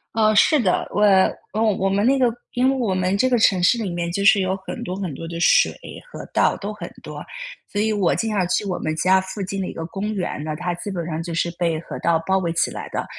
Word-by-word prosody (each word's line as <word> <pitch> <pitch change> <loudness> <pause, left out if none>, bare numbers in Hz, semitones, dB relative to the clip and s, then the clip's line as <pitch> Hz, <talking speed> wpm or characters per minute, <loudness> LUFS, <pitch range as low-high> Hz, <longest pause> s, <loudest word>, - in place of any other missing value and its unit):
呃， 215 -1 +3
是 305 +8 +5
的。 185 -5 +1
我 205 - -1
嗯， 210 +2 +2
我 195 - +1
们 200 +3 +1
那 275 +2 +4
个 250 -3 +2 0.2
因 255 +1 +2
为 - - -1
我 220 -7 0
们 185 +1 0
这 255 +5 +2
个 245 - +3
城 195 -4 +3
市 205 +7 +4
里 215 -4 -3
面 170 0 -3
就 200 - -1
是 200 +1 +6
有 190 0 0
很 - - -6
多 180 - -4
很 190 -5 -4
多 165 +5 -7
的 170 0 -6
水、 - - +4 0.4
河 - - -8
道， - - +3
都 205 +1 -5
很 210 - -8
多。 - - -8 0.5
所 205 - -2
以 220 - +1
我 200 -5 +1
经 225 -1 -1
常 190 -4 0
去 180 - 0
我 185 -3 -3
们 155 0 -2
家 185 +4 +3
附 190 +1 -5
近 195 +1 -4
的 185 - -3
一 - - -6
个 165 - -5
公 200 +4 -4
园， 180 -5 -3
那 155 0 -4
它 175 +2 -3
基 175 - -7
本 175 -4 -4
上 165 -1 -3
就 170 0 -5
是 170 +1 0
被 165 -2 +1
河 - - -8
道 170 -1 +2
包 190 +1 +2
围 170 -3 -1
起 170 - 0
来 - - -6
的。 - - -2
190 Hz, 290 characters per minute, -22 LUFS, 175-210 Hz, 0.5 s, 是